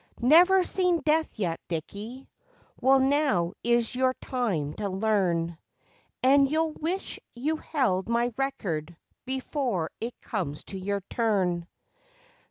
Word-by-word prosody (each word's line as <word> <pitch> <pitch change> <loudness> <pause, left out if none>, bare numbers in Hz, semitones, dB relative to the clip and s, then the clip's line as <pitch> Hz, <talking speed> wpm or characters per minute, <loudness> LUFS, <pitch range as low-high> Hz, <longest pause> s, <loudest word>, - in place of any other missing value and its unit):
Never 360 +8 +6
seen 360 -2 +1
death 315 0 +1
yet, 170 -6 -1
Dickie? 205 - -6 0.5
Well, 270 +1 +5
now 265 - +2
is 235 0 +2
your 255 0 +2
time 190 - -2
to 205 -1 -2
learn, 185 -5 0 0.6
And 275 +1 +5
you'll 320 +1 +1
wish 345 +6 -3 0.2
you 300 +6 -1
held 230 - 0
my 235 +1 +1
record 175 - -3 0.3
before 260 - -2
it 235 +2 -5
comes 160 -9 -4
to 195 - -5
your 200 +1 -2
turn. 185 -5 0
235 Hz, 120 wpm, -27 LUFS, 185-275 Hz, 0.6 s, Never